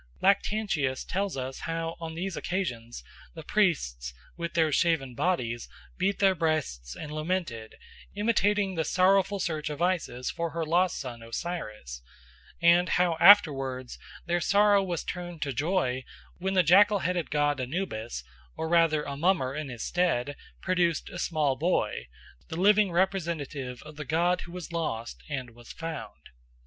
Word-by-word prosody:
Lactantius 195 -9 +1
tells 195 -4 -2
us 130 0 -4
how 165 0 -3
on 165 -1 -6
these 185 +1 -3
occasions 120 - -3 0.3
the 160 - -8
priests, 60 - 0 0.2
with 170 0 -5
their 160 -2 +3
shaven 150 -5 +1
bodies, 120 -7 -1 0.3
beat 195 +1 +1
their 195 -1 +4
breasts 155 - -2
and 150 - -7
lamented, 155 -8 -3 0.4
imitating 205 -2 +2
the 165 -2 0
sorrowful 195 +4 +3
search 155 -4 -2
of 150 - -5
Isis 170 -9 -1
for 170 0 -3
her 165 +1 -3
lost 175 +3 +2
son 120 -4 -6
Osiris, 110 - -5 0.6
and 170 +1 +5
how 175 -2 +2
afterwards 135 -9 +5 0.3
their 175 0 0
sorrow 205 +2 +4
was 175 -4 -3
turned 175 -2 -5
to 140 -2 -3
joy 130 -3 0 0.4
when 190 +2 -1
the 185 - +5
jackal 205 +6 +6
headed 175 -2 -1
god 145 -2 +1
Anubis, 125 - -4 0.3
or 160 - -2
rather 165 -2 +3
a 140 - -5
mummer 150 -4 +1
in 150 -1 -4
his 120 -3 -6
stead, 145 -7 0 0.3
produced 175 -4 +1
a 175 - -6
small 150 -6 +1
boy, 145 - 0 0.4
the 160 - -5
living 205 0 +4
representative 165 -8 -2
of 150 -1 -12
the 150 - -5
god 170 +5 +1
who 170 - -10
was 180 -1 -7
lost 120 -9 -3
and 130 -4 -4
was 120 +1 -13
found. 165 -1 -7
165 Hz, 150 wpm, -28 LUFS, 135-180 Hz, 0.6 s, jackal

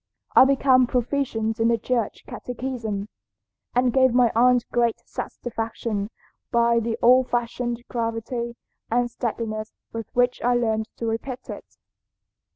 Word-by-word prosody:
I - - +9
became 260 -2 +4
proficient 235 -3 -1
in 225 - +3
the 235 0 +3
Church 235 0 -2
catechism, 235 -5 -4 0.7
and 250 -1 +3
gave 260 -2 +4
my 245 -2 +5
aunt 245 +1 +4
great 235 -1 +1
satisfaction 225 -3 -4 0.4
by 235 0 +3
the 230 0 -2
old 255 +1 +6
fashioned 240 0 -2
gravity 235 0 -3 0.3
and 240 +1 +1
steadiness 220 -2 -3 0.2
with 225 -1 -5
which 245 0 +2
I 245 +1 +2
learned 220 -2 0
to 230 - -4
repeat 230 +3 -4
it. - - -9
235 Hz, 130 wpm, -24 LUFS, 225-250 Hz, 0.7 s, I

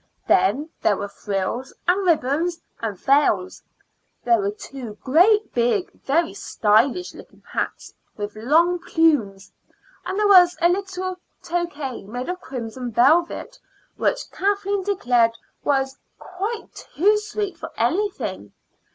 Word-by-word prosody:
Then 235 - +2
there 205 - +2
were 200 - -4
frills 205 +6 -3 0.2
and 370 +3 +3
ribbons 330 +2 +1 0.2
and 215 -4 -3
veils; 265 -7 +2 0.6
there 235 -2 +3
were 200 0 0
two 225 +1 -8
great, 400 +10 +4
big, 240 +10 +1
very 325 +5 0
stylish 240 - +1
looking - - -15
hats, - - -4 0.2
with 205 0 -5
long 325 +11 +3
plumes; 270 - +1 0.5
and 375 - -4
there 420 0 +3
was 360 -3 +7
a 345 - +4
little 370 0 -2 0.3
toque 330 -7 -3
made 245 +6 -5
of 365 0 -4
crimson 245 -1 -6
velvet, 335 - +2 0.4
which - - -1
Kathleen 400 0 0
declared 245 - +2 0.3
was 270 -1 0 0.2
quite 405 +5 -5
too 420 +5 +1
sweet 420 -3 -4
for - - -8
anything. 370 - -1
300 Hz, 125 wpm, -22 LUFS, 235-365 Hz, 0.6 s, was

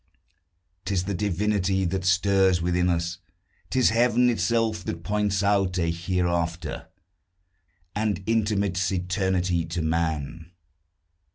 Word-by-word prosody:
'Tis 95 -3 -1
the 100 +2 -3
divinity 95 0 0
that 95 +1 -2
stirs 95 0 +3
within 90 +1 +1
us; 85 0 -1 0.5
'Tis 130 -4 +3
Heaven 120 +1 +3
itself, 115 -4 0
that 85 0 -5
points 105 -1 0
out 100 -2 +2
a 85 -2 +1
hereafter, 85 -2 -2 1.1
And 105 -2 -1
intimates 100 -4 0
eternity 90 -1 0
to 85 0 -3
man. 80 +1 -2
95 Hz, 105 wpm, -25 LUFS, 85-100 Hz, 1.1 s, stirs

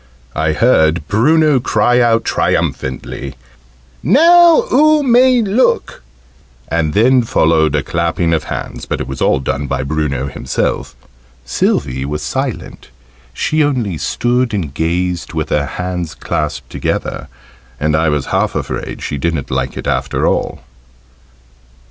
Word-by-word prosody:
I 80 -1 0
heard 80 - +2
Bruno 150 +6 +3
cry 125 0 +2
out 115 -1 +2
triumphantly 65 +1 -2 0.7
"Now 340 - +6
oo 305 0 +4
may 250 -1 +4
look!" 215 +5 0 0.7
and 80 -2 -1
then 125 +4 +4
followed 80 - +2
a 75 - 0
clapping 85 +2 -1
of 80 -2 -1
hands, - - -6
but - - -2
it - - -4
was 65 - -6
all 65 - +2
done 70 +2 -3
by - - -2
Bruno 70 -2 -2
himself. 65 - -3 0.5
Sylvie: 65 +1 -1
was 75 +2 -4
silent - - -4 0.4
she 155 - 0
only 120 - -1
stood 120 -1 0
and 80 -9 -3
gazed 85 +2 -2
with 80 -1 -3
her 70 -1 0
hands 90 -3 -4
clasped 70 -5 -4
together, 65 - -3 0.5
and 75 +1 +1
I 80 0 +2
was 75 -3 -1
half - - 0
afraid - - -4
she 70 - -4
didn't 80 -1 -2
like 65 0 -2
it - - -6
after - - -1
all. - - -1
85 Hz, 135 wpm, -15 LUFS, 75-125 Hz, 0.7 s, Now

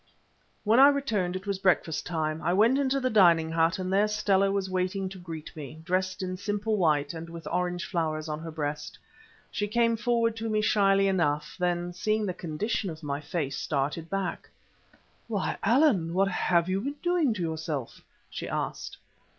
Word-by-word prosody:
When 220 +3 +4
I 275 - +10
returned 225 -11 0
it 185 +1 -5
was 200 -2 -2
breakfast 180 -4 +1
time. 155 -2 -2
I 175 +3 +1
went 230 +8 +4
into 275 0 +1
the 255 -1 0
dining 170 -6 +5
hut, 165 +3 +2
and 185 0 -3
there 205 +2 +4
Stella 200 -2 +2
was 195 -1 -1
waiting 185 +1 -1
to 190 0 -10
greet 165 -3 -8
me, 150 0 -8
dressed 185 +2 -1
in 185 0 -3
simple 205 +2 -1
white 155 -6 +1
and 165 0 -7
with 165 -1 -9
orange 180 0 -1
flowers 155 -3 -2
on 150 0 -3
her 165 +1 -7
breast. 150 -2 -4 0.5
She 205 - -2
came 230 +2 +2
forward 230 -1 +1
to 225 0 -3
me 215 0 +1
shyly 195 -2 +3
enough; 150 -4 0
then, 175 0 -1
seeing 215 +3 0
the 185 - -2
condition 185 +5 -2
of 160 -1 -9
my 140 -1 -2
face, 145 -3 -3
started 150 +3 -2
back. 195 -1 -3 0.8
"Why, 210 -4 -2
Allan! 210 - +3
what 195 +1 +3
have 175 -2 +1
you 190 +1 0
been 280 +5 -3
doing 350 -6 +2
to 185 - -3
yourself?" 160 -5 -4 0.3
she - - -6
asked. - - -4
185 Hz, 185 wpm, -28 LUFS, 165-210 Hz, 0.8 s, I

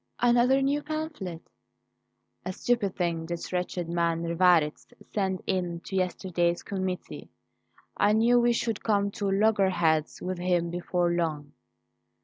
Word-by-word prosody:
"Another 245 +3 +4
new 285 +2 +1
pamphlet?" 300 - -5 1.0
"A 185 - -3
stupid 210 -3 0
thing 170 -2 -1
this 170 +1 -5
wretched 180 -1 -2
man 170 -1 0
Rivarez 170 -2 +2 0.3
sent 190 -3 -1
in 175 -3 -1
to 190 - -7
yesterday's 180 -2 0
committee. 185 -2 -5 0.7
I 205 +1 +3
knew 235 +3 +4
we 240 0 +3
should 230 -2 -2
come 200 -2 +1
to 200 -1 -2
loggerheads 190 -6 +2
with 185 -1 -4
him 175 -1 0
before 175 0 0
long." 155 -4 -2
185 Hz, 130 wpm, -27 LUFS, 170-215 Hz, 1.0 s, Another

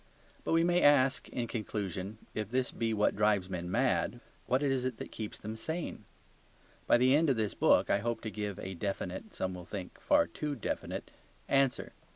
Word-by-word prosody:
But - - 0
we 165 0 +5
may 175 +1 +3
ask 135 -2 +4
in 120 - -2
conclusion, 105 -3 -4 0.2
if 105 -2 -3
this 130 +1 0
be 115 -1 -1
what 105 -1 +2
drives 105 -3 +2
men 90 -1 -3
mad, 95 - +1 0.3
what 130 +3 +2
is 135 -3 +1
it 130 -3 -2
that - - -7
keeps 110 -2 -6
them 110 +1 -6
sane? 160 +10 -4 0.8
By - - +6
the 130 +3 +5
end 160 +1 +4
of 130 - +2
this 110 -2 0
book - - +4
I - - +4
hope 115 +2 -2
to 110 - -4
give 105 -1 -4
a 95 -2 -5
definite, 95 0 -4
some 95 0 -2
will 90 -1 -7
think 90 0 -7
a - - -21
far - - +4
too 145 - -4
definite, 115 - -4 0.4
answer. 135 -2 +2
110 Hz, 195 wpm, -32 LUFS, 100-130 Hz, 0.8 s, By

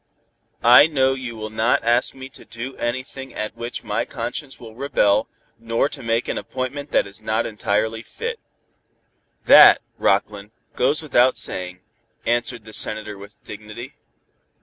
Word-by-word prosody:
"I 125 +5 +8
know 135 -4 +1
you 125 -3 -6
will 110 -1 -7
not 110 +3 +1
ask 120 +3 +2
me 130 0 -9
to - - -14
do 125 +3 -8
anything 130 +2 -5
at 110 - -5
which 120 +1 -6
my 110 +1 -1
conscience 125 +3 -6
will 115 -2 -11
rebel, 110 -5 +1 0.3
nor 115 +4 0
to - - -9
make 115 0 -1
an - - -2
appointment 140 +3 -5
that - - +2
is 100 +2 -8
not 110 0 -1
entirely 110 +1 -1
fit." 460 - -6 1.1
"That, - - +9 0.2
Rockland, 105 0 0 0.2
goes 145 +5 +1
without 130 -3 +3
saying," 90 0 0 0.4
answered 120 -1 -1
the 110 - -12
Senator 110 -1 +1
with 100 +1 -14
dignity. 110 +6 -9
115 Hz, 150 wpm, -21 LUFS, 110-130 Hz, 1.1 s, That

